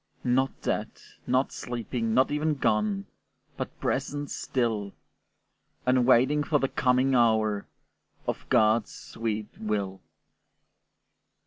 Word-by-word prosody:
Not 130 +2 0
dead, - - -1 0.4
not 130 +2 +2
sleeping, 115 -1 -3
not 130 +2 +4
even 150 +1 +1
gone, 105 -6 +1 0.5
But - - -6
present 145 +2 -2
still, 110 -6 -1 0.9
And 125 -1 +3
waiting 130 +4 +4
for 145 +1 +2
the 135 -2 0
coming 130 +1 +2
hour 110 -4 +2 0.6
Of - - -4
God's 110 0 +3
sweet 110 -2 -4
will. 100 -3 -2
120 Hz, 105 wpm, -27 LUFS, 110-130 Hz, 0.9 s, not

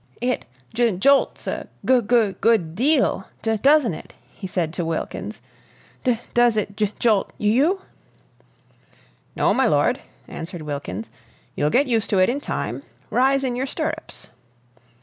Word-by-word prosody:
"It 250 +1 -1 0.3
j 230 -5 +2
jolts 275 +8 +3
a - - -4 0.2
g 255 -1 +5
goo 220 -2 +2
good 200 -9 +2
deal 260 - +1 0.2
do 225 0 +1
doesn't 280 - +4
it?" - - -10 0.2
he 190 - -7
said 170 -3 -2
to 175 - -2
Wilkins. 165 -1 -4 0.6
"D 245 -4 +1
does 240 -2 +4
it 200 -1 -2
j 210 -1 0
jolt 215 -4 +2
y - - -5
you?" 295 - +3 1.5
"No, - - +3
my - - +3
lord," - - +2 0.3
answered 170 0 -7
Wilkins. 115 -8 -5 0.4
"You'll 150 - +1
get 270 - +3
used 230 -5 0
to 200 - +2
it 185 +3 +4
in 275 +4 -1
time. - - -3 0.3
Rise 270 +2 +3
in 250 -2 -1
your 260 +2 -2
stirrups." 315 +3 -5
225 Hz, 150 wpm, -22 LUFS, 185-260 Hz, 1.5 s, g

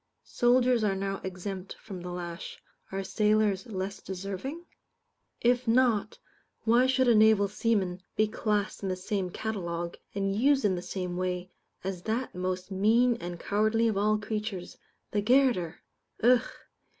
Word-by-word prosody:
Soldiers 245 -1 +3
are 200 -2 +2
now 195 0 -3
exempt 190 +1 -5
from 190 -4 -9
the 180 - -6
lash; 175 -1 -6 0.3
are 195 0 -2
sailors 210 -1 +2
less 195 -2 -4
deserving? 200 - -5 0.8
If 245 +1 +2
not, 225 -3 +2 0.5
why 235 +3 +4
should 260 0 +2
a 240 - +6
naval 215 -2 +5
seaman 195 -3 0
be 215 - +3
classed 210 -1 -1
in 195 - -2
the 185 - 0
same 185 0 -2
catalogue, 175 -4 -4 0.2
and 195 -1 0
used 270 +2 +3
in 195 - +3
the 175 - -3
same 180 -1 -4
way, 180 0 -2 0.3
as 190 -2 -4
that 225 +6 -2
most 185 +1 -3
mean 230 +6 +3
and 175 -4 -6
cowardly 215 +4 +2
of 220 - 0
all 210 +2 +2
creatures 210 -3 -4 0.4
the 205 - +1
garotter? 235 -8 +3 0.5
Ugh! 245 +1 +5
205 Hz, 150 wpm, -29 LUFS, 185-225 Hz, 0.8 s, a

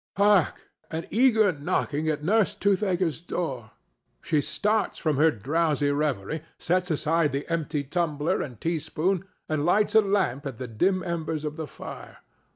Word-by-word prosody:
Hark! 200 -4 +3 0.2
an 160 +1 -4
eager 225 -3 +4
knocking 150 -1 -1
st 150 -1 -1
Nurse 210 +4 +2
Toothaker's 190 -5 +1
door. 135 -10 -4 0.5
She 155 -2 +1
starts 210 +7 0
from 155 -5 0
her 160 +3 +5
drowsy 145 +4 0
reverie, 145 -1 -1 0.2
sets 180 +1 0
aside 160 0 +1
the 140 +1 -3
empty 155 -3 -1
tumbler 150 0 -1
and 125 -6 -6
teaspoon, 165 +4 -1 0.2
and 155 -2 -1
lights 205 +6 +3
a 220 - +7
lamp 190 - 0
at 130 -5 -6
the 125 - -5
dim 185 - +1
embers 160 -3 -3
of 150 0 -3
the 160 -2 -5
fire. - - -10
160 Hz, 155 wpm, -26 LUFS, 145-185 Hz, 0.5 s, a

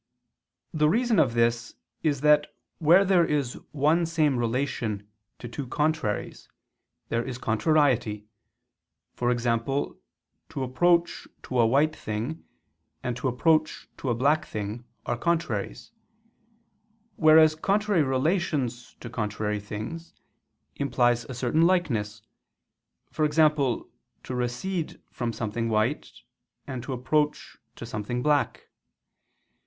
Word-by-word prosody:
The 150 -1 +3
reason 235 +4 +2
of 120 -3 +2
this 115 0 +1 0.3
is 145 -4 0
that 150 0 +5 0.3
where 175 +5 +6
there 185 -2 +4
is 145 -6 0 0.2
one 155 +4 +2
same 155 -4 +2
relation 115 -4 -2 0.3
to 120 - -8
two 130 +3 -6
contraries, 150 -6 -2 0.6
there 115 0 0
is 125 -1 -5
contrariety; 120 -4 +1 1.0
e.g. 120 -1 +1
to 120 +4 0 0.7
approach 170 +7 +1 0.2
to 130 - -2
a 115 - +5
white 145 +6 +2
thing, 115 +9 -4 0.6
and 125 -1 -2
to 125 +2 -2
approach 155 +5 +1
to 135 - -4
a 120 - +1
black 145 +6 +2
thing, 110 +3 -5 0.2
are 120 - -1
contraries; 160 - -2 1.3
whereas 155 -1 +6
contrary 200 +3 +1
relations 135 -3 -1
to - - -7
contrary 105 -2 -2
things, 110 +12 -7 0.6
implies 120 -4 +1
a 130 - -7
certain 125 +6 +1
likeness, 120 - +1 1.0
e.g. 150 -1 0
to 145 -5 +1 0.4
recede 130 +8 -3
from 120 -2 -3
something 115 +1 -3
white, 110 +6 0 0.5
and 130 -3 -5
to 130 - -6
approach 150 +4 -1 0.2
to - - -8
something 115 +4 -4
black. 150 -1 +1
130 Hz, 115 wpm, -26 LUFS, 115-155 Hz, 1.3 s, where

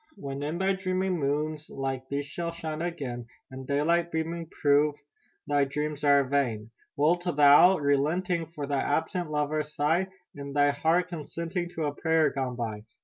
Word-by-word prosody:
"When 140 -7 -6
in 150 +3 -2
thy 190 +1 +2
dreaming 185 -1 -1
moons 150 +2 -2
like 135 -1 -4
these 140 0 -2
shall 170 +4 -4
shine 160 -2 -5
again, 135 -9 -4 0.2
And 130 0 -8
daylight 170 +4 +1
beaming 165 +1 -3
prove 145 0 +2 0.5
thy 145 -1 +2
dreams 150 +2 -3
are 140 -1 +5
vain, 125 -5 -1 0.3
Wilt 170 +5 +2
thou 175 - 0 0.4
not, 155 - -5
relenting, 165 +5 +1
for 150 -3 -6
thy 140 -1 0
absent 160 +3 -1
lover 150 0 0
sigh? 150 +4 0 0.3
In 140 -1 -7
thy 145 0 +4
heart 165 +5 +1
consenting 170 +2 -4
to 160 - -2
a 145 - -1
prayer 160 +1 +2
gone 130 -2 -3
by! 110 -3 -4
150 Hz, 165 wpm, -28 LUFS, 140-170 Hz, 0.5 s, are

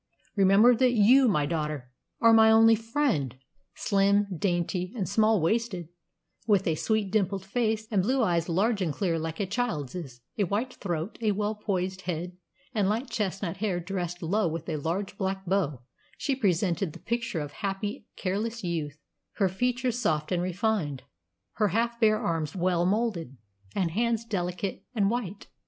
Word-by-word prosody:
Remember 200 +5 +6
that 250 +1 +3
you, 250 +5 +6
my 150 -9 +2
daughter, 150 -5 -3 0.3
are 230 0 +7
my 220 0 +7
only 225 0 +7
friend!" 225 - 0 0.4
Slim, 200 +1 +2
dainty, 175 +1 -1
and 200 -6 -2
small 215 +1 +3
waisted, 185 -1 -1 0.6
with 200 -3 +3
a 165 - +2
sweet, 210 +4 0
dimpled 195 -2 0
face, 220 0 -1
and 200 -3 +3
blue 255 +6 +1
eyes 170 -4 +1
large 200 +5 +1
and 170 -4 0
clear 165 +2 -1
like 160 0 -4
a 200 - +1
child's, 170 - -3 0.2
a 200 - +3
white 220 +8 -2
throat, 175 0 -4
a 215 -2 +2
well 210 +1 -1
poised 190 -3 -2
head, 175 +1 -3 0.4
and 205 -4 +1
light 230 +6 -2
chestnut 195 -5 -2
hair 195 -3 -1
dressed 175 -1 -4
low 200 +4 +1
with 165 0 -4
a 155 - -1
large 170 +7 -3
black 190 0 -2
bow, 165 -9 0 0.3
she 275 - 0
presented 185 - 0
the - - -11
picture 230 -4 -2
of 145 -1 -5
happy, 200 +3 -4
careless 215 +4 -2
youth, 160 -4 -3 0.4
her 195 -3 +1
features 245 +4 -1
soft 155 -8 0
and 175 -1 +1
refined, 180 - -1 0.5
her 210 -1 +3
half 235 +4 0
bare 215 -2 +4
arms 165 -6 -2
well 175 -1 +1
moulded, 190 - -1 0.4
and 180 -4 0
hands 230 +3 0
delicate 185 -2 -3
and 200 -2 +2
white. 210 -5 -4
195 Hz, 165 wpm, -28 LUFS, 170-220 Hz, 0.6 s, are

